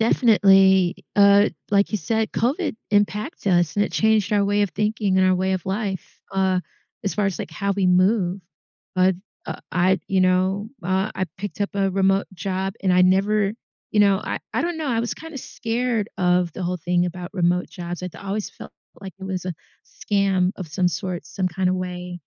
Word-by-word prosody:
Definitely. 195 -6 +4
Uh, 200 0 +6 0.2
like 200 0 +3
you 215 - +1
said, 220 +6 -1
COVID 285 +8 0 0.2
impacts 205 +6 0
us, 175 -3 +2
and 205 - +3
it - - -6
changed 220 -2 +2
our 205 -1 +3
way 205 +1 +2
of 200 - 0
thinking 210 -1 0
and 185 - +4
our 185 - +4
way 190 +1 0
of 185 -2 -2
life, 195 -1 -4
uh, 190 -1 +1 0.4
as 200 - -1
far 205 -1 +1
as, 190 -5 -2
like, - - -5
how 200 +5 -1
we 195 -1 0
move. 185 +1 +2 0.5
But, 185 0 +3 0.3
uh, - - -5
I 185 +2 +2
you 190 -1 +2
know, 185 +3 +2
uh, 190 +3 0
I 185 - -1
picked 205 +2 -6
up 200 - 0
a 195 -1 +1
remote 195 +1 +2
job, 190 +1 -3
and 185 -2 +2
I 180 - +5
never 195 +2 +3 0.4
you 210 - +3
know, 200 -2 +4
I - - -3 0.2
I - - +1
don't 340 -1 -2
know, 310 -3 -2
I 230 -3 +1
was 235 - -2
kinda 325 -2 -10
scared 235 -3 -2
of 180 -1 +2
the 185 - -6
whole 180 +1 -2
thing 175 +1 +1
about 175 0 -6
remote 180 0 +1
jobs. 175 -1 -6
It 180 -2 -6
always 200 +1 -4
felt - - -12 0.3
like 195 -1 -8
it 190 - -8
was 190 -1 -4
a 180 - -2 0.3
scam 195 -3 0
of 185 - -6
some 180 +4 +1
sort, 180 -1 -4
some 190 - -2
kinda 185 +1 0
way. 180 -1 -5
195 Hz, 200 wpm, -23 LUFS, 185-205 Hz, 0.5 s, Uh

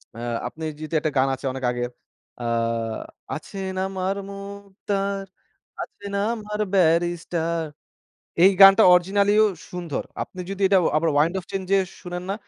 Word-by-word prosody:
আ - - -11 0.3
আপনি 140 +7 -9 0.2
জিতে 155 +1 -5
একটা 155 0 -1
গান 130 +1 +4
আছে 135 - -10
অনেক 130 0 -7
আগের 120 0 -3 0.5
আ - - -4 0.9
আছেন 190 +4 -5
আমার 190 0 -2
মুক্তার, 200 0 -4 0.6
আছেন 200 0 -8 0.2
আমার 210 -2 -5
ব্যারিস্টার। 170 -1 +1 0.8
এই 190 +2 +8
গানটা 195 +2 +9
original-ইও 200 +4 +4 0.3
সুন্দর। 175 -5 -4 0.2
আপনি 185 - -13
যদি 195 0 -5
এটা 195 0 +4 0.2
আবার 165 +1 +2
wind 160 +4 +3
of 180 - -10
change-এ 195 0 +1 0.2
শোনেন 180 -1 -6
না, - - +1
190 Hz, 135 wpm, -24 LUFS, 165-200 Hz, 0.9 s, গানটা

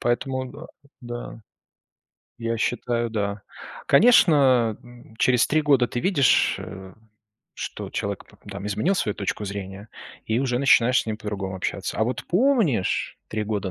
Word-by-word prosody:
Поэтому 130 +2 -1
д 140 - -12 0.4
да, 120 -1 -7 1.0
я 115 0 -2
считаю, 120 +1 -1
да. 100 -2 -3 0.4
Конечно, 140 - +5 0.4
через 125 -2 +3
3 155 +1 +2
года 140 -5 +3
ты 120 - -3
видишь, 145 -9 +3 1.0
что - - -6
человек, 100 -1 -4 0.3
там, 100 +1 -6
изменил 105 - 0
свою 105 - -1
точку 100 +1 -3
зрения, 100 +1 -7 0.4
и 110 +1 0
уже 125 -2 0
начинаешь 125 -2 +4
с - - -18
ним 110 -1 -2
по-другому 100 -3 -5
общаться. 90 - -4
А 110 - +3
вот 125 +3 -3
помнишь, 185 - +1
3 110 - -2
года 100 -3 -3
120 Hz, 135 wpm, -24 LUFS, 105-135 Hz, 1.0 s, Конечно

